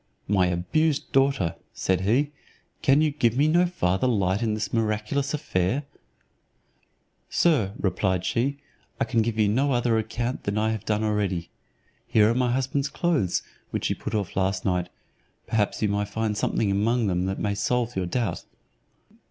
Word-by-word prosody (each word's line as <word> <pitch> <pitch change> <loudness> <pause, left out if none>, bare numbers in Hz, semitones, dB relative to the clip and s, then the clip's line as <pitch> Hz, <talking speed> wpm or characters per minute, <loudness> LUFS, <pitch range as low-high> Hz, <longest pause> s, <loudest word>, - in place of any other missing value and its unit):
"My 95 -2 +3
abused 135 - 0
daughter," 135 - +2 0.2
said 95 -1 0
he, 125 +9 +2 0.5
"can 145 -1 +4
you 155 -1 +2
give 120 -5 +1
me 145 +2 +4
no 175 +3 +4
farther 95 - 0
light 100 -4 +1
in 110 -2 0
this 110 0 -4
miraculous 115 +5 0
affair?" 125 -2 0 1.5
"Sir," 130 - +2
replied 95 -1 0
she, 130 +8 0 0.4
"I - - +2
can 115 -3 +1
give 110 0 -1
you 110 -1 +3
no 135 +7 +2
other 120 -2 +2
account 120 +3 -3
than 100 +1 -1
I 110 +1 +1
have 110 -3 -4
done 105 0 0
already. 100 -5 -1 0.6
Here 105 -1 +4
are - - +2
my 125 0 +1
husband's 135 +2 0
clothes, 150 - 0 0.3
which - - -2
he - - +2
put 110 - -5
off 100 -4 -2
last 95 0 0
night; 90 -2 0 0.6
perhaps 110 -1 0
you - - +3
may 100 0 0
find 105 +1 -2
something 100 0 0
among 115 +4 +1
them 90 -2 0
that 95 - -2
may 100 -1 -1
solve 120 +4 -1
your 95 -2 -1
doubt." 115 +4 -2
110 Hz, 170 wpm, -25 LUFS, 100-130 Hz, 1.5 s, can